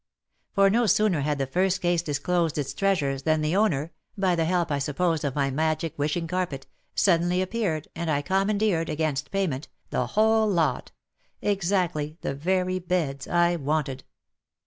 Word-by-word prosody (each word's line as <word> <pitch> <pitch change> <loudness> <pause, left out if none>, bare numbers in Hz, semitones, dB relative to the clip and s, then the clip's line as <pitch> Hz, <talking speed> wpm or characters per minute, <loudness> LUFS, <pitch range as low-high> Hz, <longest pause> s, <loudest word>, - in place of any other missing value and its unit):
For 195 -1 +4
no 235 +2 +2
sooner 200 -5 +3
had 145 +1 0
the 135 - 0
first 185 +7 +1
case 175 -2 +1
disclosed 165 +2 -1
its 145 -2 -2
treasures 150 -9 0
than 155 +1 +1
the 155 +3 0
owner 170 -7 +1
— - - -44
by 190 -2 +2
the 165 -2 +1
help 170 -1 0
I 140 - +1
supposed 160 +3 0
of 140 -3 -2
my 140 -2 +1
magic 155 +3 -1
wishing 150 +4 -1
carpet 165 -6 -3 0.2
— - - -45
suddenly 175 -1 +3
appeared, 185 -5 -1
and 170 -1 -3
I 145 -2 +1
commandeered, 195 -1 +1
against 150 -2 -1
payment, 170 -8 -2 0.2
the - - 0
whole 220 +1 +3
lot 170 -5 0 0.3
— - - -41
exactly 175 -6 0
the - - -2
very 185 +5 0
beds 165 -7 -2
I 175 0 +2
wanted. 140 -3 -2
170 Hz, 170 wpm, -26 LUFS, 150-185 Hz, 0.3 s, For